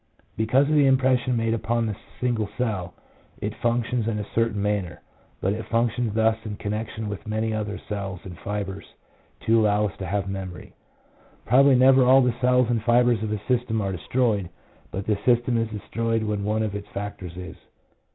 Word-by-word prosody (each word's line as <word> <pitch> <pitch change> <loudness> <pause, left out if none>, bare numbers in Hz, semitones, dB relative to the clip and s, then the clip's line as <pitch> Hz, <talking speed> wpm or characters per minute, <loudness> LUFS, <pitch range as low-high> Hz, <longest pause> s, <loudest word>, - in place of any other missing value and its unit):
Because 125 +6 +3
of 155 - +1
the 145 -2 +5
impression 130 -2 +3
made 115 0 +1
upon 115 +1 0
the 110 -2 -2 0.2
single 115 -4 0
cell 105 -8 -2 0.4
it 105 +1 -3
func 120 0 +1
tions 120 -3 -1
in 110 -2 -1
a 105 - -3
certain 115 -2 +1
manner, 100 -4 -1 0.4
but 95 - +1
it 110 +1 -6
functions 115 -1 0
thus 110 0 +2
in 105 -2 -5
connection 110 +1 -4
with 100 -2 -6
many 110 +1 -1
other 105 -2 -3
cells 100 -3 -4
and 90 -2 -8
fibres 100 -1 -5 0.5
to 115 0 +3
allow 105 0 +3
us 100 - -4
to 95 - -4
have 100 +1 -1
memory. 95 -2 -6 0.7
Probably 135 +3 +6
never 130 +1 +6
all 130 +1 +6
the 125 -1 +2
cells 125 -1 +4
and 115 -2 0
fibres 120 -1 +3
of 110 -1 -2
a 105 - 0
system 120 -3 +1
are 100 -2 -1
destroyed, 105 0 0 0.4
but 95 +1 -5
the 105 -2 0
system 120 0 +3
is 115 -1 0
destroyed 115 +1 -2
when 105 -2 -2
one 110 +1 +1
of 105 -2 -2
its 100 0 -6
factors 100 -3 -6
is. 90 0 -8
110 Hz, 190 wpm, -25 LUFS, 100-120 Hz, 0.7 s, Probably